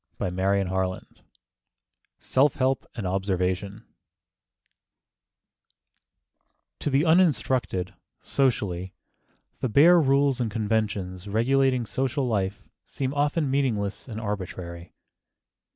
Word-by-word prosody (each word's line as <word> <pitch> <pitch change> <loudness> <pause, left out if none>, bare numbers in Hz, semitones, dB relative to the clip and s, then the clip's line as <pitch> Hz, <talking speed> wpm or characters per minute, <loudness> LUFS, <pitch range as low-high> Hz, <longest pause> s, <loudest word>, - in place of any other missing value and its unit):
CHAPTER 90 -1 -3 0.3
XLIV 95 0 -2 1.1
SELF 135 +2 +2
HELP 130 0 0
AND 110 - -4
OBSERVATION 95 +2 -2 2.9
TO - - -2
the 140 +3 +2
uninstructed, 135 - +2 0.3
socially, 95 -9 -1 0.6
the 130 - -1
bare 170 +9 +6
rules 140 -2 +2
and 115 - 0
conventions 105 -4 -2
regulating 130 +3 +2
social 135 +3 -1
life 100 -3 -2 0.2
seem 135 0 -3
often 145 0 0
meaningless 115 -8 -1
and 110 -3 -6
arbitrary. 90 -5 -6
110 Hz, 90 wpm, -26 LUFS, 95-135 Hz, 2.9 s, bare